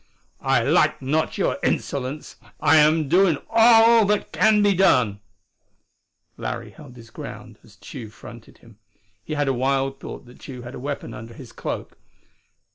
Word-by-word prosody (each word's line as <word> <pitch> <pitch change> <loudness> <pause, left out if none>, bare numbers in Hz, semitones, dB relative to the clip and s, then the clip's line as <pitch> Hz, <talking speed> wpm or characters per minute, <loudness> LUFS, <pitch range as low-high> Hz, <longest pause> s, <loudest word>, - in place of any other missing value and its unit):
"I - - +2
like - - +2
not 155 +4 -1
your - - -1
insolence. 140 +2 -3 0.2
I 160 - +4
am 155 0 +3
doing 175 0 +3
all 230 0 +6
that 210 0 -1
can 215 -1 +3
be 205 -1 +4
done." 125 - +2 1.2
Larry - - -5
held 140 -5 -14
his 115 -2 -15
ground 110 0 -10
as 105 -2 -19
Tugh 115 +1 -10
fronted 115 +1 -14
him. 115 -3 -20 0.4
He 155 - -6
had 145 -1 -1
a 135 - +1
wild 135 +1 -1
thought - - -9
that 125 +1 -17
Tugh 125 -3 -10
had 120 - -9
a - - -8
weapon 140 +2 -5
under 115 +1 -10
his 125 -3 -12
cloak. - - -6
135 Hz, 160 wpm, -22 LUFS, 120-165 Hz, 1.2 s, all